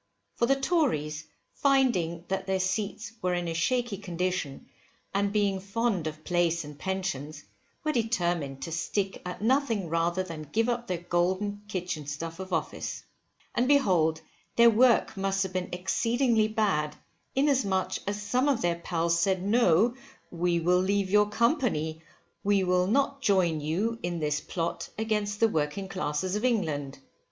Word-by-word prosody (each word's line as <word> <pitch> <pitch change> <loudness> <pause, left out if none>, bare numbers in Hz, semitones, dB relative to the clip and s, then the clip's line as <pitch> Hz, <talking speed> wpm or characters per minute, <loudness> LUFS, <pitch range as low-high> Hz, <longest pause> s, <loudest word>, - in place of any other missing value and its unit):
For 235 - +1
the 275 - +4
Tories, 240 - 0 0.3
finding 225 - +2
that 190 0 -2
their 190 0 +1
seats 200 +3 -2
were 180 0 +1
in 175 -1 -2
a 165 - -2
shaky 240 +6 0
condition, 180 -6 -3 0.5
and 200 0 +1
being 200 -2 +1
fond 195 -3 -1
of 155 0 -7
place 170 -1 +1
and 150 0 -9
pensions, 155 -5 -3 0.4
were 310 - +1
determined 175 - -1
to 165 - -5
stick 190 +4 -2
at 180 +3 -6
nothing 230 - +1
rather 170 +3 +1
than 155 -5 -8
give 225 +2 +2
up 240 0 -2
their 180 - -1
golden 185 +4 -1
kitchen 180 -7 -4
stuff 165 +4 -5
of 190 0 -7
office. 165 -3 -3 0.5
And 245 - +1
behold 180 - +3 0.3
their 235 0 +7
work 235 0 +4
must 195 0 +1
have 190 -1 -5
been 185 -1 -2
exceedingly 230 +5 +1
bad, 195 -9 0 0.4
inasmuch 260 -9 +1
as 205 +1 -1
some 250 +7 +1
of 255 -8 +1
their 170 -1 +1
pals 170 0 0
said 185 +1 +1
no: 215 0 +4 0.4
we 170 0 +1
will 180 +2 +3
leave 195 0 0
your 210 0 +4
company, 210 - +1
for - - -27 0.4
we 200 -1 +3
will 180 0 +2
not 275 +5 +1
join 185 - +3
with 150 - -5
you 220 +9 0
in 175 0 -2
this 150 -1 0
plot 170 -2 -3
against 210 -2 -1
the 225 - +5
working 160 +1 -2
classes 185 0 -2
of 210 - -2
England. 155 - 0
190 Hz, 160 wpm, -28 LUFS, 170-220 Hz, 0.5 s, their